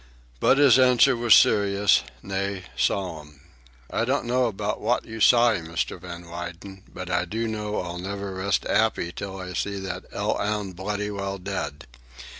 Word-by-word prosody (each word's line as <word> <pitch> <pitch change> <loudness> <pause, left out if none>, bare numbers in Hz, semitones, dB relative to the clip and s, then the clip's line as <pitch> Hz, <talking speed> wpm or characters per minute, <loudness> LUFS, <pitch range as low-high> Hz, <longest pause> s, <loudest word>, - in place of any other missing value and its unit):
But - - +4
his 140 -3 +6
answer 130 +1 +5
was 120 -1 +6
serious, 100 -1 +4 0.2
nay, 100 0 -3
solemn. 75 -1 -2 0.5
"I 115 - +1
don't 130 +3 0
know 125 +1 +2
about 105 -1 -3
wot 120 +3 0
you 115 0 -8
s'y, 115 -2 +5
Mr. 85 +2 -3
Van 85 -1 -8
W'yden, 85 +3 -8
but 90 0 -7
I 90 0 +1
do 110 +6 -3
know 105 -1 -3
I'll 90 -1 -6
never 100 +1 -5
rest 95 +1 -1
'appy 110 -6 +1
till 95 +1 -6
I 90 -1 -6
see 100 +3 -2
that 95 - -5
'ell - - -1
'ound 105 -2 -2
bloody 105 +3 -3
well 100 -1 -4
dead. 75 -5 -5
100 Hz, 165 wpm, -25 LUFS, 90-110 Hz, 0.5 s, his